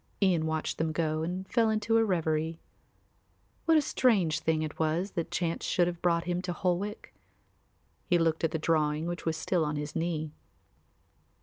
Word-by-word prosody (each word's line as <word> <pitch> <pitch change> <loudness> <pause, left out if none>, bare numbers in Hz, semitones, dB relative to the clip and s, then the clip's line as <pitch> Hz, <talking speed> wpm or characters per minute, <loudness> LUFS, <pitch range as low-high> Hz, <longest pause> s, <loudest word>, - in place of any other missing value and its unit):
Ian 175 -5 +2
watched 160 -1 -2
them 160 0 0
go 155 -1 -1
and 180 +3 -3
then - - -27
fell 230 -2 +3
into 220 +1 +2
a - - +4
reverie. 160 -4 0 1.1
What 325 -1 +5
a 305 - +3
strange 190 - +2
thing 160 -1 0
it 155 - -6
was 165 +5 0
that 170 - -3
chance 170 -2 -2
should 175 - +2
have 175 -1 -4
brought 170 -1 +2
him 175 0 -1
to 180 -1 -3
Holwick! 185 +4 -2 0.9
He 175 - +4
looked 165 -1 +1
at 165 - +3
the 160 - -2
drawing 155 -1 +1
which 175 -1 -4
was 160 -1 0
still 170 +1 0
on 150 0 -1
his 145 0 -4
knee. 160 -2 -2
170 Hz, 185 wpm, -29 LUFS, 160-180 Hz, 1.1 s, What